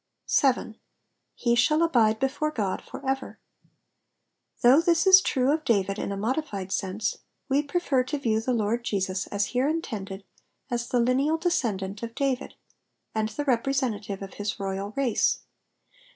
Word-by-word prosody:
7. 250 -5 +1 0.7
ife 235 0 +4
sJuUl 305 +7 +4
abide 220 -8 +3
heft/re 285 +3 0
God 200 -4 -1
for - - -10
ecer^ 270 0 -3 1.3
Though 260 +6 +7
this 335 0 +2
is 380 0 +9
true 265 -6 +1
of 310 0 -1
David 200 -5 +1
in - - -3
a 200 - -3
modified 210 -4 -2
sense, 200 +3 -2 0.3
we 280 +1 +2
prefer 285 -3 0
to 295 +3 -2
view 225 -5 0
the 255 - -1
Lord 230 0 0
Jesus 190 -4 -1
as 205 0 0
here 255 +3 +2
intended 205 -11 -4 0.5
as 240 0 -1
the 245 - +1
lineal 265 +6 +2
descendant 215 - -1
of 230 0 -6
David, 275 -2 -1 0.6
and 220 0 0
the 290 +7 -4
representative 235 -6 -1
of 195 - -9
his 205 +1 -4
royal 195 +1 -3
race. 260 -5 +1
240 Hz, 150 wpm, -26 LUFS, 205-275 Hz, 1.3 s, is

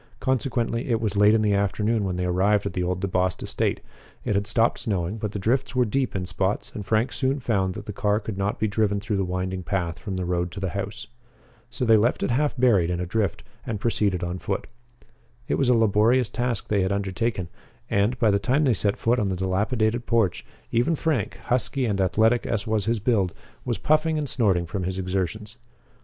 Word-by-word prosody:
Consequently, 120 -2 -1
it 115 -2 +2
was 105 -3 -2
late 105 +2 +5
in 110 - +2
the 105 -1 +2
afternoon 105 +2 +1
when 95 -2 -2
they 90 0 -1
arrived 100 +3 +2
at 100 - -3
the 90 - -1
old 90 +1 -1
DeBost 90 -2 0
estate. - - -1 0.4
It - - +1
had 100 +1 0
stopped 115 +1 +2
snowing, 95 -1 -2
but 105 -2 -3
the 105 - -4
drifts 125 +7 0
were 125 -1 +3
deep 130 +2 -1
in 95 -1 -2
spots, 95 +3 -2
and 105 - -5
Frank 110 +5 +1
soon 130 +4 0
found 100 -8 0
that 105 -1 -7
the 105 - -6
car 105 +2 +1
could 110 -1 -6
not 100 +1 -1
be 110 - 0
driven 105 -1 +1
through 105 0 -2
the 95 - +1
winding 90 0 -3
path 90 -3 -2
from 100 -3 -5
the 95 -1 -2
road 90 0 -1
to 100 - -6
the 95 -1 -2
house. 100 +1 -5 0.6
So 125 - -3
they 115 -1 +6
left 115 +4 +1
it - - 0
half 145 +3 +1
buried 110 -9 +3
in 90 -1 -1
a 90 - -2
drift 100 0 -1 0.2
and 110 -3 -4
proceeded 100 -5 0
on 90 +1 -3
foot. - - -3 0.8
It - - 0
was 135 -3 +2
a 125 - +5
laborious 115 +2 +3
task 120 -1 -2
they 100 -2 +1
had 95 +1 0
undertaken, 100 0 -1 0.4
and, 105 +5 +1
by 115 -4 +3
the 100 - +2
time 130 +8 +1
they 130 -4 +4
set 100 0 +1
foot 120 +2 +1
on 100 -3 0
the 95 - -1
dilapidated 110 +5 0
porch, 110 -7 +1 0.3
even 120 +8 +2
Frank, 150 -8 -1
husky 125 +2 0
and 100 -4 0
athletic 110 +5 +2
as 105 -3 -1
was 110 -3 0
his 115 +1 +1
build, 100 -5 +1 0.3
was 120 -3 -1
puffing 155 +1 +2
and 150 -1 -2
snorting 95 -9 +1
from 90 +3 -4
his 95 +1 -3
exertions. 95 +4 -3
105 Hz, 220 wpm, -25 LUFS, 95-115 Hz, 0.8 s, they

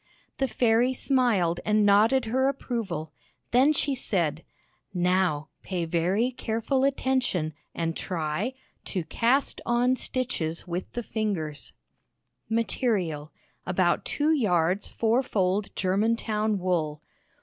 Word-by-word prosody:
The 270 - +2
fairy 245 +1 +2
smiled 220 -12 +2
and 210 0 +3
nodded 220 +6 +4
her 260 +4 +1
approval; 225 - -3 0.4
then 260 +5 +5
she 285 -1 0
said, 170 - -1 0.5
"Now, 180 -4 +1
pay 180 -3 -2
very 180 +9 +1
careful 245 +3 -1
attention, 260 - 0 0.2
and 165 -1 -1
try 180 +8 -2 0.3
To 185 -4 -3
Cast 235 - +1
on 245 +2 +2
Stitches 205 -12 -3
with 175 +1 -4
the 240 - -3
Fingers 185 -10 -3 0.8
Material: 200 - -1 0.4
About 180 -1 +2
2 300 +2 0
yards 185 - +1
four 230 +3 +2
fold 200 -4 0
Germantown 215 +2 +1
wool. 165 -5 -1
210 Hz, 110 wpm, -27 LUFS, 175-245 Hz, 0.8 s, then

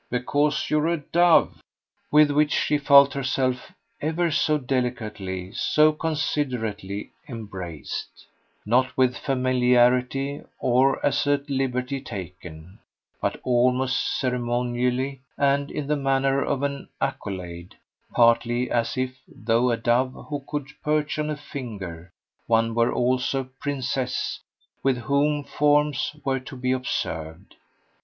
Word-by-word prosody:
"Because 145 +4 0
you're 150 +1 +2
a 170 0 +1
dove." 170 +3 +3 0.5
With 150 0 +5
which 150 +1 +3
she 150 - +1
felt 140 0 +7
herself 130 -2 -1 0.3
ever 160 +2 0
so 155 0 +2
delicately, 110 -8 -3
so 150 +6 +3
considerately, 125 -10 -2 0.2
embraced; 95 - -7 0.4
not 130 +4 +2
with 130 -1 +3
familiarity 125 +1 +2 0.2
or 130 +2 +2
as 145 0 +1
a 145 0 +3
liberty 135 -1 -1
taken, 90 -5 -9 0.4
but - - -1
almost 125 +1 +1
ceremonially 125 +1 -1 0.2
and 140 0 +2
in 150 - -4
the 150 +2 +1
manner 135 0 +1
of 140 -1 -1
an 140 -1 -3
accolade; 90 -9 -5 0.4
partly 120 +1 +3
as 120 +1 0
if, 130 0 -3
though 115 +3 +1
a 115 - +1
dove 120 +3 +1 0.2
who 145 -2 -3
could 145 -2 -4
perch 150 0 0
on 150 0 -1
a 150 - -2
finger, 100 - -7 0.4
one 115 0 +2
were 115 +1 +2
also 130 +2 +1
a 130 0 -14
princess 130 -2 -2 0.4
with 135 -2 +2
whom 145 +4 +1
forms 145 -1 +1
were 135 -1 +1
to 130 +1 -10
be 125 0 -1
observed. 80 -9 -3
130 Hz, 120 wpm, -24 LUFS, 120-140 Hz, 0.5 s, felt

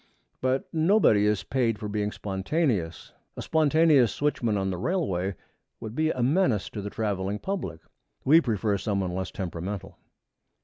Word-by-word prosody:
But 130 +1 0
nobody 160 - +4
is 105 -3 +1
paid 120 -3 0
for 105 - -5
being 105 0 -2
spontaneous. 100 - -2 0.2
A - - -4
spontaneous 155 -5 +4
switchman 120 -7 0
on 95 -1 -1
the 90 - -3
railway 100 - -1 0.4
would 110 -1 -7
be 155 +4 +1
a 125 -6 -1
menace 130 - +1
to 105 - -5
the 100 - -5
traveling 100 -2 -2
public. 105 - -4 0.4
We 160 +5 +7
prefer 105 - 0
some 100 +1 -1
one 90 -2 -2
less 95 +1 -3
temperamental. 95 0 -6
105 Hz, 150 wpm, -27 LUFS, 95-145 Hz, 0.4 s, We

